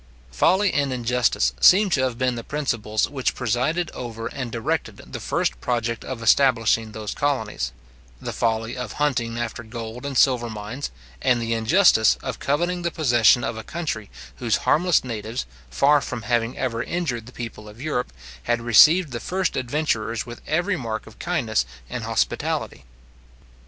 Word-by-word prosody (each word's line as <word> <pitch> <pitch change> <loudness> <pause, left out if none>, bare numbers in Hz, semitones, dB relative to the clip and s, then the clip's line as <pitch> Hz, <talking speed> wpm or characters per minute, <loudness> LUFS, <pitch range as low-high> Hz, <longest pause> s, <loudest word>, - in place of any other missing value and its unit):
Folly 185 - +3
and 140 -2 +1
injustice 120 - +1
seem 195 +1 +6
to 140 - +2
have 130 -3 -1
been 130 0 +1
the 115 -1 -5
principles 115 -7 -1
which 135 -3 -2
presided 130 +8 0
over 115 -2 -6
and 125 0 -5
directed 115 -1 -2
the - - -8
first - - -1
project 115 -2 -1
of 125 -3 -6
establishing 115 -3 +3
those 105 -1 -5
colonies; 110 - -1 0.5
the - - -5
folly 115 0 -1
of 125 -4 -5
hunting 120 -6 0
after 120 0 -3
gold 115 +1 -7
and 140 -2 -3
silver 120 -3 +3
mines, 110 +5 -5 0.3
and 125 -2 +3
the 115 0 -1
injustice 115 - +4
of 130 -3 -4
coveting 175 +5 0
the 170 - 0
possession 120 -7 +4
of 115 - -3
a 110 - -6
country 145 -9 -4 0.3
whose - - +1
harmless 175 +1 +3
natives, 115 - -4 0.2
far 145 - +4
from 115 - -5
having 120 +2 0
ever 120 -2 -1
injured 125 -7 -3
the - - -10
people 115 -3 -8
of 105 +2 -14
Europe, 135 -3 -2 0.3
had 120 0 +1
received 150 - +6
the 120 - -4
first 185 - -1
adventurers 120 -4 -1
with 120 -1 -9
every 175 +5 +1
mark 115 -5 -4
of 110 - -15
kindness 130 - 0 0.3
and - - -4
hospitality. - - -1
120 Hz, 160 wpm, -23 LUFS, 115-145 Hz, 0.5 s, seem